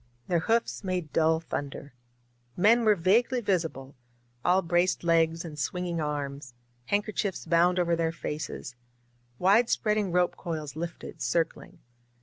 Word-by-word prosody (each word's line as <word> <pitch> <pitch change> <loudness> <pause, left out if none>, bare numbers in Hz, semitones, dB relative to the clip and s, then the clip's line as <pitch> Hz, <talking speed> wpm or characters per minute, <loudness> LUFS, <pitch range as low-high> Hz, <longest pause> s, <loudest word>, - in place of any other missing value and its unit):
Their 175 -2 +2
hoofs 225 +5 0
made 180 -6 -3
dull 160 0 +3
thunder. 145 -3 -6 0.6
Men 230 +5 +4
were 215 -1 +5
vaguely 225 +8 +2
visible, 160 - -2 0.5
all 185 +2 +3
braced 175 +2 +1
legs 165 0 +2
and 150 -2 -8
swinging 175 +3 -2
arms, 140 -3 -4 0.3
handkerchiefs 205 -2 -1
bound 175 +2 +3
over 170 -1 +2
their 165 -1 0
faces; 155 -5 -5 0.6
wide 210 +6 +4
spreading 210 -3 +1
rope 180 0 +2
coils 155 -4 -5
lifted, 170 +2 -7
circling. 165 -1 -1
170 Hz, 130 wpm, -28 LUFS, 160-190 Hz, 0.6 s, were